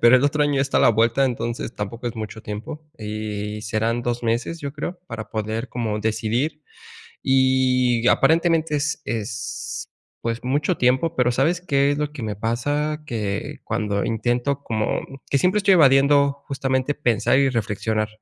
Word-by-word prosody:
pero 120 +2 +7
el 130 - +2
otro 150 +1 +2
año 145 -2 +2
está 135 0 +1
a - - +3
la - - +6
vuelta, 115 +4 +3
entonces 120 -1 -3
tampoco 115 +4 -5
es 120 - -4
mucho 110 0 -6
tiempo 105 +9 -6 0.2
y 105 -1 -4
serán 115 +2 -1
2 120 0 -2
meses, 120 +8 -1
yo 140 -1 -4
creo, 165 +4 -5
para 105 -2 -6
poder 110 +2 -3
como 115 -3 -2
decidir. 115 +8 -1 0.6
Y 130 -2 +3
aparentemente 165 +1 +3
es 150 +1 -1
es, 110 -1 -4 0.3
pues 115 0 -3
mucho 145 +7 +1
tiempo, 130 +7 +2
pero, 125 -1 +3
¿sabes 160 +8 +1
qué 140 -5 +2
es 145 - -2
lo 150 0 -2
que 135 - -7
me 105 -3 -3
pasa? 145 +7 -1
Que 105 -5 -3
cuando 100 -2 -1
intento 120 +5 0
como, 110 -4 -1
mm, 135 - -11
que 140 - +3
siempre 185 +7 +2
estoy 200 -1 +4
evadiendo 140 -1 +4
justamente 135 0 -1
pensar 125 -2 +2
y 140 -1 +4
reflexionar. 110 -2 -1
125 Hz, 170 wpm, -22 LUFS, 110-140 Hz, 0.6 s, pero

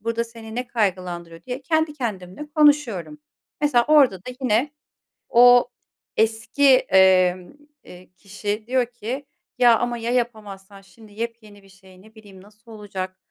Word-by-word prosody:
burada 230 +2 -2
seni 230 -1 -12
ne 250 +1 -4
kaygılandırıyor?" 180 -7 -3
diye 250 +5 -6
kendi 315 0 0
kendimle 215 0 -6
konuşuyorum. 295 - +2 0.4
Mesela, 255 -5 +2
orada 285 -10 +5
da 190 +7 -10
yine 250 +3 +1 0.6
o 245 +1 +6 0.5
eski, 225 +5 +1
emm, 185 -2 +3 0.3
eee, 180 0 -15
kişi 205 +2 -5
diyor 255 0 +1
ki, 245 +4 -7 0.3
"Ya 240 -2 +5
ama 240 -1 -2
ya 230 +1 -4
yapamazsan 210 -5 -4
şimdi 205 +3 -19
yepyeni 220 -2 -8
bir 195 - -21
şey, 190 -1 -19
ne 220 +2 -20
bileyim, 205 -4 -16
nasıl 215 +3 -18
olacak?" 190 -3 -7
220 Hz, 140 wpm, -22 LUFS, 195-245 Hz, 0.6 s, o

